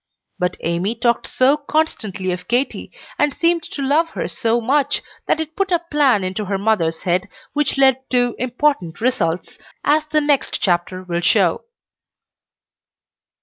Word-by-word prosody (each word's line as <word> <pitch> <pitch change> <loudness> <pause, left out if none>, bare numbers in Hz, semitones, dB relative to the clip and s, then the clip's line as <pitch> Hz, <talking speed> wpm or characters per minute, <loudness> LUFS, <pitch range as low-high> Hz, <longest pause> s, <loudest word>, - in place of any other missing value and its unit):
But 180 0 -1
Amy 175 +7 -1
talked 235 0 +1
so 260 +3 +3
constantly 220 - -1
of 180 0 -5
Katy, 250 +3 -1 0.3
and 295 -2 +2
seemed 335 0 +2
to 280 - -5
love 305 +5 +2
her - - -1
so 230 +1 0
much, 270 +5 +1 0.2
that - - +2
it 320 0 -5
put 390 -1 -1
a 350 - +5
plan 275 -9 +3
into 190 +3 -3
her 195 0 -1
mother's 185 -6 0
head 180 +2 0 0.3
which 295 -2 0
led 265 -1 +3
to 245 -2 +1
important 250 - 0
results, 185 -9 -1 0.2
as 300 +1 +3
the 305 0 +2
next 290 -2 +1
chapter 185 0 0
will 175 -1 -2
show. 180 - +2
245 Hz, 150 wpm, -20 LUFS, 185-290 Hz, 0.3 s, a